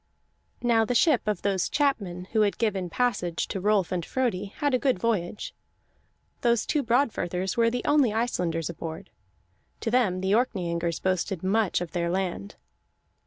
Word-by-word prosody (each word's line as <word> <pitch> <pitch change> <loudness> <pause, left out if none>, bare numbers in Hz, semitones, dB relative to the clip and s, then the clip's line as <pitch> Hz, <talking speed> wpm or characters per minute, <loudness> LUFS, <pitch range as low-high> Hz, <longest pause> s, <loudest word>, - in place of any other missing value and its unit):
Now 230 -2 +4
the 245 +3 -1
ship 255 -4 +3
of 210 -4 -1
those 195 -3 +1
chapmen 200 - 0
who 220 - +2
had 205 -1 +2
given 195 -6 -1
passage 180 -6 -1
to 195 - -3
Rolf 200 -2 +2
and 180 -2 -1
Frodi 230 -4 -1
had 280 +8 -2
a 255 - +3
good 260 -4 +2
voyage; 205 -2 -2 0.9
those 235 -2 +2
two 300 - +1
Broadfirthers 210 -7 0
were 230 -1 +3
the 245 +1 -3
only 290 -6 +4
Icelanders 180 -8 -1
aboard. 160 -1 -7 0.7
To 225 - -1
them 210 -7 +2
the 190 +1 0
Orkneyingers 175 -8 0
boasted 185 -1 -1
much 195 -1 +1
of 175 - -5
their 170 -1 -1
land. 180 - -3
200 Hz, 160 wpm, -26 LUFS, 180-235 Hz, 0.9 s, Now